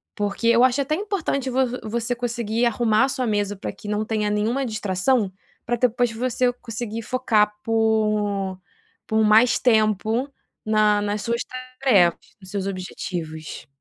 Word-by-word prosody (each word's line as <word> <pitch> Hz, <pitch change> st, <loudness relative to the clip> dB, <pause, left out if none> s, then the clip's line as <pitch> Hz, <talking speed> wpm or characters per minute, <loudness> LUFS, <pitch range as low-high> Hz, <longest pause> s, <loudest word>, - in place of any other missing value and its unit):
Porque 205 Hz, +2 st, -2 dB
eu 235 Hz, +1 st, +5 dB
acho 255 Hz, +2 st, +3 dB
até 280 Hz, +3 st, 0 dB
importante 345 Hz, -9 st, -2 dB
vo 260 Hz, +1 st, +2 dB
vo 250 Hz, +1 st, -4 dB
você 235 Hz, +2 st, -1 dB
conseguir 235 Hz, -1 st, -1 dB
arrumar 235 Hz, +1 st, +2 dB
sua 255 Hz, -2 st, -2 dB
mesa 205 Hz, -1 st, 0 dB
para 195 Hz, -, -5 dB
que 200 Hz, +1 st, -12 dB
não 210 Hz, +1 st, -1 dB
tenha 215 Hz, -1 st, -1 dB
nenhuma 225 Hz, +6 st, 0 dB
distração, 215 Hz, 0 st, 0 dB, 0.3 s
para 240 Hz, -, 0 dB
depois 245 Hz, 0 st, +1 dB
você 245 Hz, +2 st, 0 dB
conseguir 230 Hz, -1 st, -6 dB
focar 215 Hz, -3 st, +1 dB
por 225 Hz, -, -1 dB, 0.8 s
um -, -, -14 dB, 0.5 s
por 220 Hz, 0 st, +1 dB
mais 220 Hz, +3 st, +5 dB
tempo 220 Hz, +1 st, +2 dB, 0.4 s
na 215 Hz, -1 st, +3 dB
nas 205 Hz, 0 st, -2 dB
suas 235 Hz, +2 st, -1 dB, 0.4 s
tarefas, 195 Hz, -11 st, +4 dB, 0.2 s
nos 190 Hz, -, -10 dB
seus 200 Hz, -2 st, -2 dB
objetivos. 175 Hz, -4 st, -6 dB
225 Hz, 150 wpm, -23 LUFS, 210-245 Hz, 0.8 s, eu